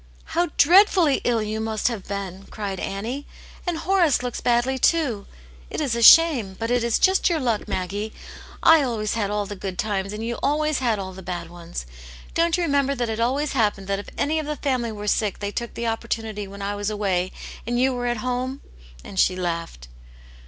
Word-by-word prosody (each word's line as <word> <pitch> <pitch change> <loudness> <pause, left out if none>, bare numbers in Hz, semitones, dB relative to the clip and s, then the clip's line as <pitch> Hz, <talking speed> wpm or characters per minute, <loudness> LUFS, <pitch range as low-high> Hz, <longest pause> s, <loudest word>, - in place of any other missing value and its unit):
" - - -27
How 345 +1 +3
dreadfully 355 -2 +5
ill 230 -3 +1
you 215 +1 -3
must 220 -1 -1
have 230 -6 -3
been 195 -1 -5
!" - - -19
cried 200 -3 -4
Annie. 230 +9 -4 0.4
"And 345 -2 0
Horace 345 -8 +2
looks 245 -1 -4
badly, 245 +2 +1
too. 255 -11 +1 0.4
It - - -4
is 275 -7 0
a 235 - -1
shame. 250 -8 +7
But 225 +1 -2
it 245 -1 +2
is 235 -1 +2
just 380 0 +3
your 335 -2 +1
luck, 235 -6 -1
Maggie. 205 +2 -3 0.5
I 325 -1 +7
always 225 -6 -1
had 210 -3 -1
all 210 0 -1
the 205 0 -6
good 190 -1 -6
times, 195 -2 -1
and 215 +2 -5
you 235 0 -3
always 305 +1 +1
had 235 -4 +1
all 190 -1 -5
the 190 - -10
bad 175 -2 -5
ones. 170 - -7 0.5
Don't 335 0 +2
you 355 - 0
remember, 280 -3 +1
that 240 -3 -2
it 220 0 -3
always 270 +5 0
hap* 220 -6 +2
pened 195 - -11
that 195 0 -1
if 205 - -8
any 315 +2 +1
of 305 - -4
the 300 - -2
family 255 -6 -1
were 210 -1 -7
sick 210 0 +1
they 205 0 -4
took 235 +2 -5
the 235 - -3
opportunity 225 -2 -3
when 200 +1 -8
I 200 +1 -2
was 205 0 -2
away 190 -4 -1 0.4
and 240 0 0
you 260 +1 +3
were 245 -1 -2
at 240 0 0
home?" 255 +2 -2 0.4
And 190 - -6
she 185 - +4
laughed. 170 - -4
230 Hz, 215 wpm, -23 LUFS, 200-270 Hz, 0.5 s, shame